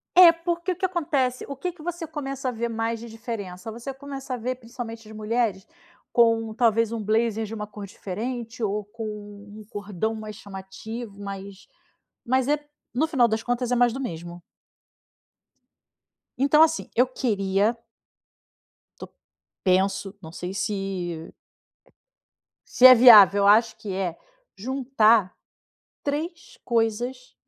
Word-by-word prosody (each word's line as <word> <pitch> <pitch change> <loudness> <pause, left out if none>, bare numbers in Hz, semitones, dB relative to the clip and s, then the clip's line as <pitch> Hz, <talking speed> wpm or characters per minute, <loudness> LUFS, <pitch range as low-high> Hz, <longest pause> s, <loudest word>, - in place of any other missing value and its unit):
É, 355 -2 +10
porque 340 +2 -2
o - - -12
que 375 - -1
acontece, 295 -8 0
o 280 - -4
que 360 +7 -3
que 340 -3 -16
você 345 0 -4
começa 275 -4 -5
a - - +1
ver 235 0 -3
mais 225 0 -2
de 235 0 -9
diferença: 220 -4 -6
você 235 +4 -6
começa 270 -1 -6
a - - -6
ver, 250 +3 -3
principalmente 230 -2 -8
de 220 - -11
mulheres, 215 -2 -1 0.4
com 225 -2 +3
talvez 230 -1 +2
um 225 -2 -3
blazer 225 +1 +1
de 215 - -8
uma 210 -1 -4
cor 205 -1 -9
diferente, 230 +5 -6
ou 210 0 -1
com 225 +2 -8
um 205 0 -9
cordão 205 +1 -3
mais 215 -1 -7
chamativo, 200 +2 -8
mas 195 -1 -8 0.6
mas 260 +1 +1
é, 295 +1 +3 0.3
no 280 +7 +1
final 260 -6 +3
das 220 0 -2
contas, 245 0 -1
é - - +3
mais 240 -1 +3
do 265 - -5
mesmo. 175 -5 -6 2.0
Então 285 +4 +5
assim, 320 0 0
eu 250 - +5
queria 210 -3 0 1.2
Tô - - -9 0.5
penso. 195 +1 +1
Não 160 -1 -10
sei 180 +2 -6
se 190 -5 -3 1.4
se 255 - +9
é 255 - +10
viável, 210 -5 +8
eu - - +5
acho 225 +3 +5
que 200 -3 -6
é, 185 -3 -2 0.4
juntar 230 -4 +2 0.7
3 330 +4 -4
coisas 240 +2 -1
225 Hz, 145 wpm, -25 LUFS, 205-255 Hz, 2.0 s, É